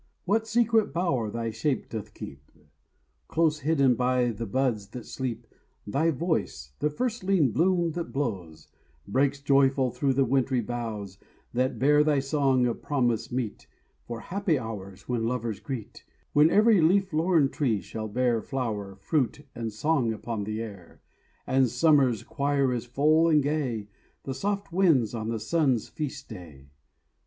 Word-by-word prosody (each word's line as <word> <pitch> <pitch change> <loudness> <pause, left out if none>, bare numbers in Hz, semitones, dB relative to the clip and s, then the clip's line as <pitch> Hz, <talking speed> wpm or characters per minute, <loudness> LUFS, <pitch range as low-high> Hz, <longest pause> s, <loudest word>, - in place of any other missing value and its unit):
What 220 +4 +1
secret 225 -1 +2
bower 155 - 0
thy 115 +1 -3
shape 130 +5 -1
doth 110 -3 -7
keep? 70 +1 -10 0.8
Close 160 -2 +1
hidden 140 -3 +3
by 125 0 +1
the 115 +1 -5
buds 115 -3 0
that 120 +3 -9
sleep; 130 -3 -4 0.4
Thy 140 +10 +1
voice—the 145 - -2
firstling 190 - +1
bloom 175 - +2
that 170 +1 -5
blows— 95 - -4 0.4
Breaks 135 +6 +1
joyful 135 -2 +3
through 135 +1 0
the 135 +1 +2
wintry 130 0 +1
boughs, 110 -5 -5 0.3
That 130 +2 0
bear 150 +2 +4
thy 150 -1 +2
song 135 -2 +2
of 120 -2 -2
promise, 120 -6 0
meet 120 -4 -4 0.4
For 115 -1 -5
happy 190 -4 0
hours 100 -5 -7
when 115 -2 -1
lovers 115 -3 -2
greet, 130 -7 -7 0.3
When 150 +2 +6
every 210 0 +5
leaf 190 +3 +3
lorn 160 -3 +3
tree 120 -9 0
shall 110 +2 -6
bear 120 +1 +1
Flower, 105 -8 -4
fruit, 135 +7 -1
and 115 -2 -4
song 120 +1 +1
upon 110 -1 -4
the 110 +2 -3
air, 100 -6 -11 0.4
And 130 -1 +3
summer's 130 -2 +3
choir 140 -2 0
is 120 -1 -3
full, 155 +6 +3
and 150 -3 +4
gay 135 -8 -1 0.4
The 135 - -4
soft 200 +6 -3
winds 160 - +3
on 110 -1 -3
the 115 -1 -2
sun's 130 -1 +1
feast 145 -2 -5
day. 70 -6 -11
130 Hz, 150 wpm, -27 LUFS, 115-155 Hz, 0.8 s, When